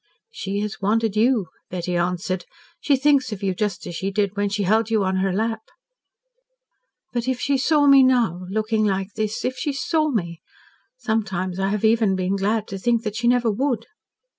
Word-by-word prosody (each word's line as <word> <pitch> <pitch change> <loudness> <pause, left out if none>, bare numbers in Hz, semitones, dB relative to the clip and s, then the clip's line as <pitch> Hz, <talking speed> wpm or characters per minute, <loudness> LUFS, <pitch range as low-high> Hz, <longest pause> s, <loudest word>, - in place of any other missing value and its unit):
"She 200 - -3
has 210 0 -5
wanted 215 +1 +1
you," 220 -5 +2 0.2
Betty 180 0 -3
answered. 180 +1 -1 0.3
"She 285 - +2
thinks 275 -3 +2
of 205 -2 -6
you 190 -1 +1
just 200 0 -3
as - - -6
she 190 +3 -2
did 200 0 -1
when 205 0 0
she 205 0 -1
held 220 +3 +2
you 220 -3 +2
on 190 0 0
her 190 0 +1
lap." 220 +3 -1 1.5
"But 240 0 -2
if 260 -1 0
she 280 +2 +1
saw 290 +2 +3
me 275 -1 +7
now 235 -9 +2
looking 215 +2 0
like 195 -1 -1
this! 215 0 -3
If 255 +1 -2
she 290 +2 -2
saw 310 +3 0
me! 170 - -3 0.6
Sometimes 195 - -2
I 195 - +1
have 210 +2 0
even 220 -3 +3
been 185 +1 -1
glad 210 +2 0
to 195 - -5
think 235 +2 +1
she 235 +2 -1
never 245 -2 +3
would." 255 +3 -1
215 Hz, 190 wpm, -22 LUFS, 190-240 Hz, 1.5 s, me